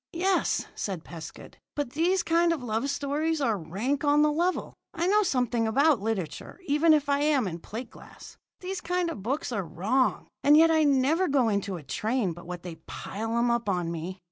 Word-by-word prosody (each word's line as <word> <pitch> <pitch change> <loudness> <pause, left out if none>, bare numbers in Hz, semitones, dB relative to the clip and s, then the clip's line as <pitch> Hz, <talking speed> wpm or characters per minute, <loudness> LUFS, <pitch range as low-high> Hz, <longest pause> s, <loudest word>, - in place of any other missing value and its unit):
"Yes," 370 +3 +1
said 185 -6 -4
Pescud, 165 -1 -10 0.2
"but 290 -4 -2
these 345 +5 +1
kind 335 0 +3
of 315 -6 -2
love 230 +4 -1
stories 290 +3 -1
are 235 -6 +1
rank 205 - -2
on 295 0 +4
the 300 - +3
level. 345 +4 -1 0.2
I 340 +1 0
know 415 +3 +4
something 245 - 0
about 275 +1 +3
literature, 205 - -4
even 300 +1 +3
if 295 -1 0
I 280 0 +2
am 290 -6 +2
in 170 -1 -5
plate 225 +9 -7
glass. - - -14 0.3
These 370 0 -4
kind 355 0 -1
of 205 - -7
books 265 +8 -2
are 210 -4 -1
wrong, 220 +10 0 0.2
and 290 +2 +7
yet 325 +1 +6
I 315 -1 +4
never 290 +6 +3
go 270 -5 +2
into 200 -2 -1
a 160 - -10
train 215 - -1
but 175 +1 -12
what 175 -1 -6
they 175 -3 -7
pile 225 +3 -4
'em 235 0 +2
up 235 -3 0
on 175 -3 -1
me. 170 +3 -5
265 Hz, 200 wpm, -27 LUFS, 205-315 Hz, 0.3 s, and